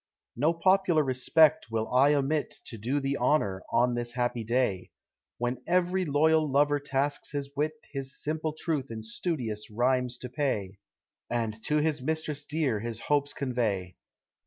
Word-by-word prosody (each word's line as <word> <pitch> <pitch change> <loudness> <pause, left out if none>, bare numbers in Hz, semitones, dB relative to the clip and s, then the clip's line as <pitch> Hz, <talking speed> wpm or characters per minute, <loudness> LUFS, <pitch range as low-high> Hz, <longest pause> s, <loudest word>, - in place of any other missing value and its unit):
No 150 +7 +2
popular 185 -2 +3
respect 140 +3 +3
will 110 0 -1
I 140 +4 +5
omit 145 +2 0
To 115 - -7
do 130 +7 0
thee 135 0 -1
honor 100 -11 +1
on 120 +1 +3
this 120 0 -3
happy 120 -1 -1
day, 110 -5 0 0.5
When 120 +1 -2
every 180 +1 +2
loyal 155 +1 +3
lover 145 +1 +3
tasks 140 +1 -1
his 140 -1 -3
wit 150 +2 0 0.2
His 135 -1 -3
simple 155 0 -2
truth 155 -4 -2
in 110 -1 -6
studious 110 - -3
rhymes 125 +2 +1
to 125 - -7
pay, 105 -9 -2 0.5
And 110 -2 -2
to 150 - +2
his 150 -1 +1
mistress 150 0 -1
dear 150 -8 0
his 115 +1 -4
hopes 145 -1 +1
convey. 110 -9 -2
135 Hz, 155 wpm, -28 LUFS, 120-150 Hz, 0.5 s, I